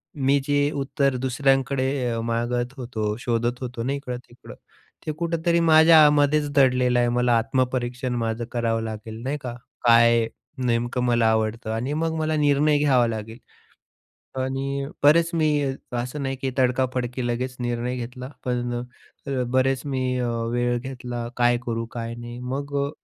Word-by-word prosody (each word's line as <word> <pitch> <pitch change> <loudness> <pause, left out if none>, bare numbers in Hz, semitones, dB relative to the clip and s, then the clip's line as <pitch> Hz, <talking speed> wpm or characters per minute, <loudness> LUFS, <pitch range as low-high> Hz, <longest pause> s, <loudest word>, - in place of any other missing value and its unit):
मी 140 0 +2
जे 145 0 +2
उत्तर 140 -1 0
दुसऱ्यांकडे 135 +1 +1 0.2
अ, 115 - -2
मागत 120 +2 -1
होतो, 110 -4 -3
शोधत 120 +1 -1
होतो 120 -2 -4
ना 135 +3 -1
इकडं-तिकडं. 125 -3 -8 0.5
ते 155 - -1
कुठेतरी 170 +1 0
माझ्यामध्येच 150 -2 +5
दडलेलं 125 -2 +4
आहे. 120 - +3
मला 120 -1 +2
आत्मपरीक्षण 125 +1 -1
माझं 115 0 -2
करावं 115 -2 0
लागेल. 110 +1 -6
नाही 140 +3 -2
का? 120 -2 -5 0.3
काय 115 -1 +5 0.4
नेमकं 120 +1 0
मला 120 -2 +2
आवडतं 110 0 -1
आणि 125 +6 -2
मग 160 +1 -1
मला 155 0 0
निर्णय 145 0 +3
घ्यावा 130 -5 +3
लागेल 110 0 -5 1.0
आणि 135 +1 -2 0.2
बरेच 165 +3 +5
मी 155 -2 +2 0.5
असं 125 +4 -3
नाही 135 0 -2
की 135 - 0
तडकाफडकी 125 -1 0
लगेच 125 +1 -2
निर्णय 120 +1 -2
घेतला. 125 +1 -6 0.2
पण 120 -1 -1 0.5
अ, 135 -2 -1
बरेच 130 0 +2
मी 130 -2 -1
अ, 120 - 0 0.3
वेळ 120 0 +1
घेतला 125 -2 -6
काय 120 0 +4
करू 115 -1 -2
काय 115 -1 -5
नाही. 120 +1 -8
मग 140 +3 -4
अ, - - -4
125 Hz, 145 wpm, -24 LUFS, 120-140 Hz, 1.0 s, माझ्यामध्येच